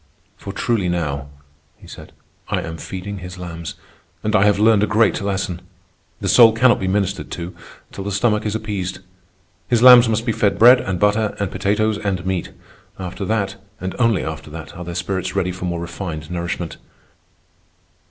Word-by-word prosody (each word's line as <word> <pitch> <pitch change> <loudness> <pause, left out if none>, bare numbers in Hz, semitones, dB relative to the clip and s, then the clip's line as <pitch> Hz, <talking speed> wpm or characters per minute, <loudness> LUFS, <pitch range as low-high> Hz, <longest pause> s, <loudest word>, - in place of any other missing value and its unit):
"For 100 - -8
truly 100 -2 0
now," 75 -5 -2 0.5
he - - -17
said, - - -11 0.4
"I - - 0
am 80 0 -6
feeding 95 +4 -6
his 90 0 -9
lambs. 85 -3 -7 0.5
And 105 0 0
I 100 -1 +5
have 105 -1 +4
learned 110 0 +4
a 105 - +2
great 110 -1 +2
lesson. 95 -3 -2 0.6
The - - -2
soul 115 -2 +7
cannot 120 +2 +4
be 95 - -2
ministered 100 0 -1
to 85 +1 -6 0.4
till 100 - -7
the 100 - -4
stomach 105 +1 +1
is 105 0 -2
appeased. 100 -4 -3 0.7
His 120 -1 +2
lambs 125 -2 +9
must 115 +1 0
be 115 - +1
fed 105 -2 +1
bread 125 +2 +7
and 95 -2 -3
butter 105 +2 +2
and 100 -3 -2
potatoes 105 +2 0
and 95 -3 -2
meat; 95 -2 -2 0.5
after 95 +2 -6
that, 100 -2 -1 0.2
and 95 0 -4
only 115 -5 +2
after 80 -1 -6
that, 80 0 -9
are 90 - -7
their 85 0 -6
spirits 95 +1 -3
ready 90 -2 0
for 90 0 -6
more 85 -1 -2
refined 85 -2 -6
nourishment." 85 -1 -4
95 Hz, 180 wpm, -20 LUFS, 90-105 Hz, 0.7 s, lambs